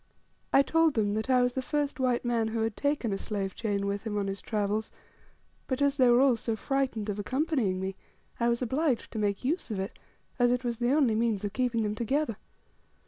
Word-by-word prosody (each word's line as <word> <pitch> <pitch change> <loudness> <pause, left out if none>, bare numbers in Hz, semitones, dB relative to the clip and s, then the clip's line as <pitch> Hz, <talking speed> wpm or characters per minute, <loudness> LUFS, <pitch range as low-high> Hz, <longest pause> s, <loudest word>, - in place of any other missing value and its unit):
I 275 - +6
told 325 0 +3
them 205 -2 +1
that 220 +4 -2
I 250 -1 +5
was 245 0 +1
the 260 - -1
first 290 +1 -2
white 250 -2 +1
man 235 -2 +1
who 225 0 -2
had 220 -1 -1
taken 285 -7 0
a 195 - -2
slave 195 -3 -3
chain 200 -3 -2
with 200 0 -2
him 215 -2 -3
on 200 - 0
his 195 0 -4
travels; 210 0 -1 0.8
but, 260 -1 -1
as 285 0 +2
they 255 -3 +5
were 240 0 +6
all 270 -3 +5
so 225 0 -2
frightened 260 -2 -1
of 205 -1 -3
accompanying 255 - 0
me, 190 0 -3 0.4
I 235 0 +2
was 235 +1 0
obliged 265 +1 0
to 220 - -4
make 205 +2 -1
use 315 +4 -1
of 210 -3 -3
it, 190 +2 -5 0.4
as 245 0 +5
it 250 +1 +1
was 240 -1 -2
the 240 +1 +2
only 275 -6 +3
means 220 -2 0
of 200 - -4
keeping 240 -2 0
them 210 0 -1
together. 235 +1 -1
235 Hz, 225 wpm, -29 LUFS, 210-260 Hz, 0.8 s, I